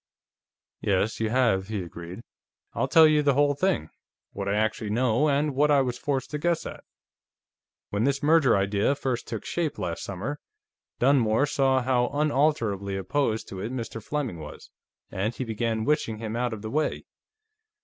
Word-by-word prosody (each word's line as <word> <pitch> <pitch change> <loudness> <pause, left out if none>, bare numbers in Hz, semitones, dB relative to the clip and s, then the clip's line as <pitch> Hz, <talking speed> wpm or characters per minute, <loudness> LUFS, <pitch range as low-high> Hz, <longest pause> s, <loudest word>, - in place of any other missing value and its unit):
"Yes, 100 +2 0
you 110 -1 0
have," 115 -6 +2
he 105 -3 -3
agreed. 85 +4 -9 0.5
"I'll - - 0
tell 160 -1 +7
you 155 -1 +4
the 140 -2 +2
whole 145 0 +3
thing, 140 - 0 0.4
what 100 0 -4
I 100 - +1
actually 110 0 -1
know, 125 +5 +2
and 145 +1 +1
what 145 +3 +3
I 145 -2 +5
was 125 -2 -1
forced 135 -3 -2
to 150 - -3
guess 170 +2 0
at: - - -8 1.1
"When 105 +2 0
this 140 +1 0
merger 155 -6 +5
idea 100 +7 +1
first 130 -3 -3
took 115 -2 -5
shape, 165 -4 -2
last 85 -3 -3
summer, 110 +11 -5 0.6
Dunmore 125 -1 +3
saw 135 -2 +2
how 125 -1 +2
unalterably 135 -10 +1
opposed 110 +3 -1
to 95 - -7
it 110 +5 -4
Mr. 115 -3 -5
Fleming 135 - -3
was, 75 -1 -10 0.4
and 105 +5 -2
he - - -3
began 115 -1 -2
wishing 140 -7 0
him 110 0 -5
out 120 0 -1
of 110 -1 -6
the 110 - -5
way. 155 +2 -1
120 Hz, 170 wpm, -26 LUFS, 105-145 Hz, 1.1 s, tell